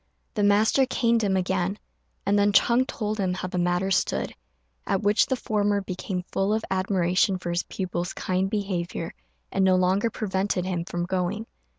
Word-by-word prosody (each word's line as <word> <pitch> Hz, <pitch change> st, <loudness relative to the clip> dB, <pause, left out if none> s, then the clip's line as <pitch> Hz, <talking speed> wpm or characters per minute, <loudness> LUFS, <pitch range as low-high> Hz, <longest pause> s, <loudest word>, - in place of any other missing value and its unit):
The 210 Hz, -, -1 dB
master 215 Hz, +6 st, +4 dB
caned 235 Hz, -3 st, +2 dB
him 195 Hz, -2 st, +2 dB
again, 185 Hz, +1 st, 0 dB, 0.5 s
and 205 Hz, 0 st, +3 dB
then 205 Hz, 0 st, +4 dB
Ch'êng 240 Hz, +5 st, +4 dB
told 215 Hz, -1 st, -3 dB
him 185 Hz, -2 st, 0 dB
how 185 Hz, -, -4 dB
the 180 Hz, 0 st, -3 dB
matter 175 Hz, +2 st, +1 dB
stood, 70 Hz, -, 0 dB, 0.5 s
at 195 Hz, -, 0 dB
which 205 Hz, +1 st, +4 dB
the 260 Hz, -, +1 dB
former 205 Hz, -4 st, 0 dB
became 185 Hz, -1 st, -4 dB
full 195 Hz, +2 st, +1 dB
of 220 Hz, -, -2 dB
admiration 185 Hz, 0 st, +2 dB
for 175 Hz, -1 st, -4 dB
his 170 Hz, +1 st, +1 dB
pupil's 180 Hz, -2 st, -4 dB
kind 185 Hz, +1 st, -1 dB
behaviour, 185 Hz, -5 st, -3 dB, 0.4 s
and 195 Hz, -, +1 dB
no 190 Hz, -1 st, +5 dB
longer 185 Hz, +5 st, +2 dB
prevented 190 Hz, -3 st, -1 dB
him 175 Hz, -2 st, -2 dB
from 175 Hz, 0 st, -3 dB
going. 190 Hz, +4 st, -2 dB
190 Hz, 175 wpm, -26 LUFS, 180-205 Hz, 0.5 s, no